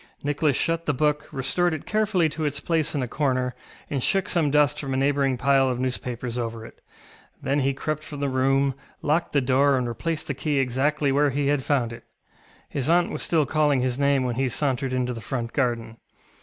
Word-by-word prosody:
Nicholas 145 0 +1
shut 165 0 -1
the 150 - +1
book, 150 +1 +1
restored 160 +6 0
it 150 - -8
carefully 210 -6 +2
to 155 +1 -4
its 145 -1 -1
place 160 -1 0
in 140 - 0
a - - -3
corner, 130 -2 0 0.3
and 140 -3 -2
shook 195 +8 +1
some 165 -5 +1
dust 150 0 +3
from 135 -2 -3
a - - 0
neighbouring 135 -1 +1
pile 135 0 +3
of 125 -1 -2
newspapers 125 -1 -3
over 115 -1 -4
it. - - -14 0.6
Then 140 +2 0
he 135 0 +1
crept 155 +2 -3
from 145 -2 -7
the 140 - 0
room, 135 +1 +2 0.3
locked 160 +3 +1
the 140 - +3
door, 135 +2 +3
and 125 -1 -1
replaced 155 +7 -3
the 140 - -2
key 145 +2 -1
exactly 135 +3 +1
where 145 +1 +3
he 140 +1 0
had 145 -1 +2
found 125 -5 0
it. - - -11 0.6
His 135 +1 -2
aunt 175 +1 +3
was - - -4
still 160 -3 +2
calling 150 -3 +2
his 130 +1 -1
name 140 -1 +3
when 120 -2 -2
he 135 -1 +1
sauntered 135 0 -1
into 125 -1 -1
the 115 - -7
front 115 +1 -4
garden. 120 -4 -1
140 Hz, 210 wpm, -25 LUFS, 130-150 Hz, 0.6 s, dust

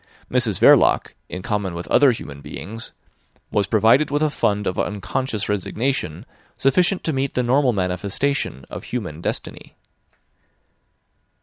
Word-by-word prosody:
Mrs 120 -6 +2
Verloc, - - +5 0.2
in 90 +1 -6
common 100 -5 -2
with 85 - -6
other 140 -2 +5
human 70 -11 -7
beings, 105 +10 -6 0.6
was 100 -2 +1
provided 115 +7 +4
with 145 +2 0
a 155 - +1
fund 105 -6 0
of 90 - -2
unconscious 105 +2 -2
resignation 105 - -2 0.3
sufficient 180 +8 +2
to 160 - -1
meet 135 0 -2
the 125 - +1
normal 130 +2 +3
manifestation 95 - -1
of - - -7
human 90 -10 -5
destiny. - - -5
110 Hz, 130 wpm, -21 LUFS, 95-135 Hz, 0.6 s, Verloc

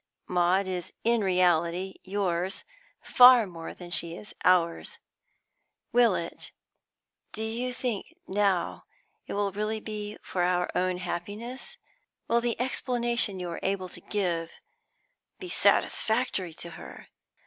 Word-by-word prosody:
Maud 180 +2 +2
is 180 -2 -4
in 230 -1 +3
reality 180 0 +2
yours 190 -1 -2 0.4
far 250 -2 +8
more 165 -3 -8
than 175 -1 -10
she 170 -1 0
is 210 - -10
ours. 180 - +2 0.9
Will 235 -5 +5
it 170 - -4 0.8
do 220 - -3
you 235 +3 -2
think 245 +4 -4
now 195 -2 0 0.4
it - - -5
will 200 0 0
really 215 +2 -2
be 210 -1 -6
for 180 - -2
our 180 0 +1
own 185 0 +1
happiness? 210 - -5 0.5
Will 235 +1 +3
the 235 -1 -1
explanation 240 -5 +1
you 175 -1 -4
are 170 - -5
able 190 -1 -1
to - - -9
give 170 -5 -1 0.8
be 370 - -8
satisfactory 220 - +1
to 170 0 -7
her? - - -11
195 Hz, 125 wpm, -28 LUFS, 180-230 Hz, 0.9 s, far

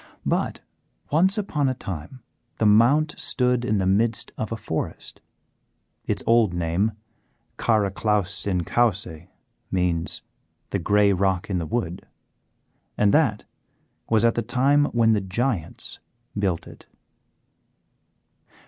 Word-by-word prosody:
But - - -1 0.5
once 185 +8 +3
upon 150 -9 0
a 130 - -2
time 95 - -7 0.3
the 110 - +1
Mount 125 +9 +4
stood 125 -1 +1
in 105 -3 +1
the 95 - 0
midst 110 +4 +1
of 110 - -4
a 115 - -2
forest; 105 -7 -5 0.9
its - - -1
old 115 -6 +3
name, 85 +6 0 0.6
"Caraclowse 105 -2 0
in 90 -3 0
Cowse," 95 -7 -1 0.4
means 90 -3 -1 0.5
"the - - 0
Grey 100 +2 +3
Rock 95 0 0
in 90 - 0
the 80 - -4
Wood," 90 -4 -3 0.9
and 105 -1 +3
that 130 -9 +2 0.6
was 115 0 +3
at 115 - +4
the 120 - -1
time 135 +5 +2
when 115 -4 +3
the 105 - +1
Giants 95 -2 -3 0.4
built 95 -5 -1
it. - - -14
105 Hz, 120 wpm, -24 LUFS, 95-120 Hz, 0.9 s, Mount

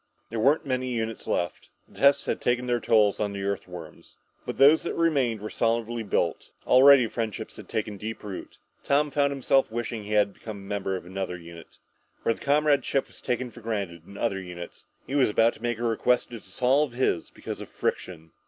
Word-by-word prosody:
There 115 - -2
weren't 140 +8 +3
many 130 -1 -1
units 115 -2 -3
left. 85 -2 -2 0.2
The - - -16
tests 140 0 +5
had - - -2
taken 125 +1 0
a 120 - +2
toll 105 -2 +4
of 105 -1 -1
the 100 0 -4
Earthworms. 90 -5 -6 0.3
But - - -4
those 145 +4 +7
that - - -4
remained 135 -10 +1
were 110 - -6
solidly 115 0 0
built. 90 -5 -1 0.2
Already 135 0 +7
friendships 110 -1 -4
had - - -11
taken 105 -1 -3
deep 110 +3 -6
root. 100 -3 -7 0.3
Tom 145 +1 +2
found 140 0 +2
himself 135 -2 +2
wishing 115 -1 -3
he 105 +1 -5
had 105 -1 +3
become 110 -2 -8
a - - -10
member 100 -1 -3
of 90 - -6
another 95 0 -4
unit. 85 -1 -13 0.5
Where 115 - +2
the - - -15
comradeship 145 -1 +2
was - - -15
taken 125 0 -2
for 120 - -13
granted 100 -7 -4
in 100 - -11
other 95 -5 -1
units, 90 -1 -9 0.2
he - - -7
was 140 -5 +4
about 115 +2 +3
to - - -17
make 120 -1 -1
a 120 - -5
request 120 +2 +1
to 115 - -6
dissolve 125 +8 +1
his 120 -9 0
because - - -7
of - - -8
friction. 80 -3 -4
115 Hz, 200 wpm, -26 LUFS, 100-130 Hz, 0.5 s, those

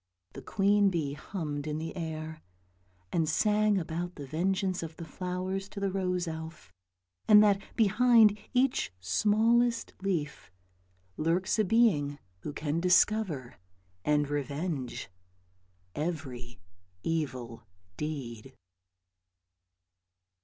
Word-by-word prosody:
The - - -8
queen 200 0 +3
bee 155 -6 -2
hummed 150 -2 -5
in 150 0 -2
the 160 +1 -5
air, 160 -2 -5 0.7
and 160 -2 +1
sang 210 +3 +3
about 175 +1 -3
the 145 - -7
vengeance 185 +5 0
of 160 -1 -7
the 165 - -7
flowers 185 +3 -4
to 200 - -7
the 200 -1 0
rose 180 -2 -1
elf, 160 - -7 0.6
and 210 -1 +8
that 200 -1 +3
behind 225 0 +5 0.2
each 255 - +1
smallest 220 - +2
leaf 155 - -3 0.7
lurks 175 +7 +1
a - - +5
being 180 -10 +3 0.2
who 150 - -5
can 150 +2 -2
discover 180 - +2 0.4
and 150 -1 +2
revenge 145 -1 -3 0.9
every 135 - -5 0.4
evil 130 -8 -3 0.3
deed. 130 -4 -5
165 Hz, 105 wpm, -30 LUFS, 150-200 Hz, 0.9 s, and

